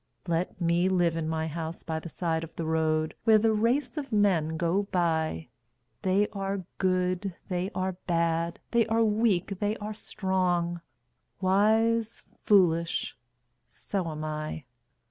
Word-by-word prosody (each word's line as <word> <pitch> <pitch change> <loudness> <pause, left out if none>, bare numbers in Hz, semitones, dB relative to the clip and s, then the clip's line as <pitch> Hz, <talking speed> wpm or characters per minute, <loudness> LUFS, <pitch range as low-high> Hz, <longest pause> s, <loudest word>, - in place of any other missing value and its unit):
Let 170 +2 -1
me 170 +1 +2
live 175 -3 +2
in 160 -1 -2
my 160 0 -1
house 160 +1 -5
by 160 -1 -3
the 170 - -8
side 165 -1 -1
of 165 - -10
the 165 - -3
road, 155 -1 +1
Where 220 -1 +6
the 220 +1 +3
race 240 +6 +1
of 280 -3 -4
men 180 -7 +2
go 175 +4 +1
by 160 - 0 0.5
They 195 +2 +2
are 195 -2 -3
good, 185 0 0
they 180 0 -1
are 185 0 0 0.2
bad, 170 -1 0
they 235 -2 +3
are 225 +1 +2
weak, 210 -3 +1
they 210 +1 0
are 210 +1 -5
strong, 180 -4 -1 0.6
Wise, 220 +4 +2 0.2
foolish 170 -5 +3 0.5
so 190 -4 -3
am 155 0 -5
I. 155 -1 -4
180 Hz, 145 wpm, -28 LUFS, 165-205 Hz, 0.6 s, Where